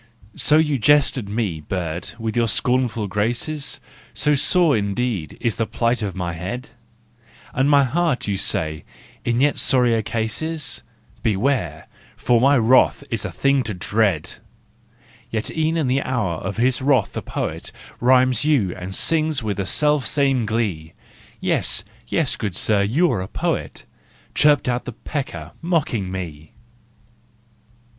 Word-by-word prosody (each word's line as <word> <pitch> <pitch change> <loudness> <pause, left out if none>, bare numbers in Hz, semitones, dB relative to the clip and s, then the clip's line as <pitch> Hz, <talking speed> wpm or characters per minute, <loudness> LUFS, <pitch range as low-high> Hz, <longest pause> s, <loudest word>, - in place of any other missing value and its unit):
So 130 +7 +3
you 150 -4 +2
jest 145 +3 +4
at 105 - -7
me, 100 -6 -2
bird, 85 +1 -4
with 115 -1 -3
your 120 -1 +2
scornful 125 -1 +1
graces? 120 +9 -1 0.4
So 150 0 +2
sore 160 +2 +3
indeed 100 - -2
is 115 -4 -1
the 115 - 0
plight 115 0 0
of 100 -4 -3
my 90 -2 -3
head? 100 +10 -5 0.8
And 135 +2 +2
my 140 -1 +6
heart, 150 0 0
you 100 - 0
say, 80 -5 -1 0.4
in 120 0 0
yet 145 +1 +2
sorrier 125 -4 +3
case 110 +3 -3
is? 160 -1 -3 0.4
Beware! 115 +5 0 0.3
for 120 -2 +2
my 140 +2 +5
wrath 120 +2 +4
is - - -2
a - - -4
thing 140 0 +2
to 110 -5 -4
dread! 100 -3 0 0.9
Yet 110 -1 -2
e'en 160 +1 +1
in 160 - +1
the 130 +2 +1
hour 110 -12 -1
of 95 +3 -5
his 125 +2 +2
wrath 130 -6 +2
the - - -3
poet - - -4 0.3
Rhymes 130 0 +4
you 130 - +2
and 90 +1 -5
sings 155 -5 +1
with 105 -2 -2
the 100 -2 -2
selfsame 140 -4 +1
glee. 100 -8 -2 0.3
" - - -24
Yes, - - +1 0.2
yes, - - +1
good 100 -5 -3
sir, 105 +2 +3
you 140 - +2
are 100 - -1
a 95 - -5
poet," - - -3 0.5
Chirped 145 -3 +4
out 125 0 -1
the 125 - -6
pecker, 140 +4 -5
mocking 140 - -1
me. 80 -5 -7
120 Hz, 150 wpm, -21 LUFS, 100-140 Hz, 0.9 s, my